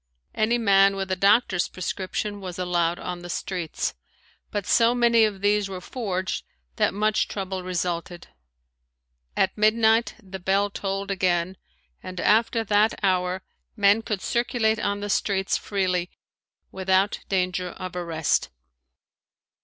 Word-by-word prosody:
Any 225 +2 +2
man 195 -3 +4
with 195 -1 -3
a - - +2
doctor's 200 -1 +3
prescription 195 +3 -4
was 180 -2 -6
allowed 175 -1 0
on 180 -1 -5
the 175 - -9
streets, 175 -2 -3 0.6
but 205 -2 -3
so 235 +1 +4
many 235 -2 +5
of 200 -3 -3
these 205 0 +2
were 190 -1 -5
forged 185 -3 -3 0.3
that - - +3
much 215 +1 +1
trouble 190 -2 -4
resulted. 175 -1 -3 1.1
At 190 - +2
midnight 220 +2 +3
the 190 -4 -9
bell 195 +2 +1
tolled 195 0 -3
again 185 -1 0 0.5
and 185 -1 -7
after 225 +3 +3
that 210 +1 +3
hour 185 -1 +1 0.3
men 205 0 +4
could 210 -4 -3
circulate 235 -2 +1
on 205 0 -1
the 205 - -3
streets 195 -1 +1
freely 185 -3 -1 0.6
without 190 +1 +1
danger 185 -1 0
of 185 +1 -8
arrest. 165 -3 0
195 Hz, 130 wpm, -25 LUFS, 185-210 Hz, 1.1 s, many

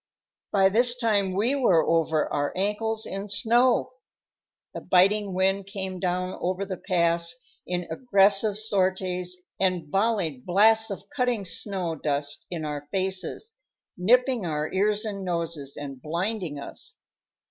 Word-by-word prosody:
By 195 -1 +4
this 240 +4 +4
time 210 -5 +1
we 225 +7 +2
were 190 - +3
over 160 -2 +2
our 145 0 0
ankles 215 +3 0
in 195 +1 -5
snow. 240 +4 +2 0.8
The - - -6
biting 195 +1 +3
wind 190 +1 +1
came 190 -2 -5
down 185 0 -2
over 185 +2 -1
the 190 -2 -5
pass 170 0 +1 0.3
in 180 -1 -2
aggressive 200 0 +3
sorties 185 -3 0 0.2
and 180 -5 0
volleyed 195 - 0
blasts 220 +6 +4
of 195 - -6
cutting 245 -6 0
snow 180 0 -3
dust 145 -1 -2
in 165 -3 -4
our 145 -1 -5
faces, 190 - -3 0.4
nipping 250 +5 +3
our 155 -2 -2
ears 210 +3 +1
and 200 -2 -4
noses, 165 -6 -3
and 140 -3 -7
blinding 170 - -3
us. 140 - -6
190 Hz, 135 wpm, -26 LUFS, 170-210 Hz, 0.8 s, By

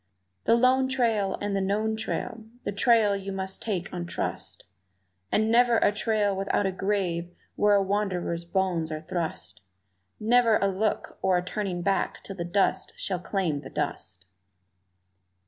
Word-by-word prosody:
The 230 - +5
lone 255 +2 +4
trail 225 -7 +1
and 205 -1 -1
the 195 - +1
known 215 +3 0
trail, 220 0 -4 0.2
the - - -2
trail 210 0 +4
you 195 0 -5
must 190 0 -4
take 195 -5 -3
on 175 -1 -4
trust, - - -4 0.7
And 220 +1 +2
never 240 0 +5
a - - +4
trail 210 -1 +1
without 195 +1 0
a 190 - +1
grave 185 -3 -1 0.3
where 205 0 +4
a 200 - +4
wanderer's 190 -4 -1
bones 170 -2 -1
are 155 0 -4
thrust 160 - -4 0.6
Never 230 0 +4
a 195 - +1
look 205 +3 -2
or 185 -1 +3
a 180 - -2
turning 185 -2 -3
back 195 +1 0
till 195 - -7
the 175 - -3
dust 190 +1 +1
shall 185 -2 -2
claim 175 -5 -1
the - - -9
dust! 95 +1 -4
195 Hz, 160 wpm, -27 LUFS, 180-215 Hz, 0.7 s, The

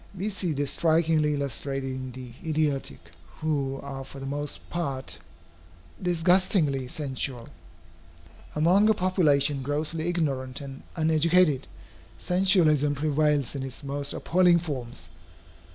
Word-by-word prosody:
We 200 +4 -1
see 185 -5 -2
this 145 -1 -1
strikingly 160 -2 +2
illustrated 135 0 -3
in 130 0 -5
the 125 -1 -9
idiotic, 150 - -2 0.3
who 140 -4 -1
are 135 -1 -6
for 135 +1 -11
the 135 - -6
most 145 +1 -5
part 135 - -3 0.8
disgustingly 175 -5 +2
sensual. 130 -3 -4 1.1
Among 180 +8 +4
a 220 - +4
population 150 -7 +2
grossly 155 +4 -2
ignorant 135 -7 -1
and 135 -2 -8
uneducated, 160 -2 +3 0.5
sensualism 170 -6 +3
prevails 150 -2 +1
in 140 - -4
its 135 +1 -6
most 140 0 -3
appalling 180 0 +3
forms. 125 - -5
145 Hz, 115 wpm, -27 LUFS, 135-165 Hz, 1.1 s, Among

